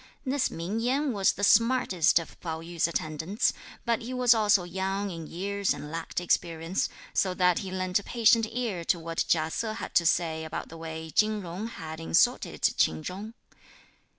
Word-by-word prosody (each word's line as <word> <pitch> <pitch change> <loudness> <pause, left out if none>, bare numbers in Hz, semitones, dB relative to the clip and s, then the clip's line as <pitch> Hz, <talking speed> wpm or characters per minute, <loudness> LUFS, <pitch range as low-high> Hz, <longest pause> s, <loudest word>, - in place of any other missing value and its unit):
This 265 0 +1
Ming 180 +7 -3
Yen 265 +4 0
was 195 -2 +3
the 200 - -6
smartest 220 -6 +4
of 165 - -3
Pao 160 -2 -4
yü's 170 0 -1
attendants, 165 - -1 0.3
but 235 -2 +1
he 250 +3 -5
was 250 -2 +5
also 210 -4 +3
young 190 +3 -2
in 165 -2 -7
years 200 +3 -1
and 150 - -8
lacked 165 +1 -3
experience, 170 0 0 0.2
so 185 -2 +1
that 180 -1 +3
he 190 - -5
lent 185 0 0
a - - -10
patient 230 0 +3
ear 225 -7 -3
to 175 - +2
what 165 0 -2
Chia 160 -1 +2
Se 220 +3 -2
had - - -6
to 170 - +4
say 160 -2 +1
about 160 - -5
the 165 - -10
way 160 0 -7
Chin 215 +1 +2
Jung 180 +5 -5
had 160 -8 -7
insulted 80 0 +1
Ch'in 80 0 +2
Chung. 210 +5 -6
185 Hz, 180 wpm, -28 LUFS, 165-220 Hz, 0.3 s, was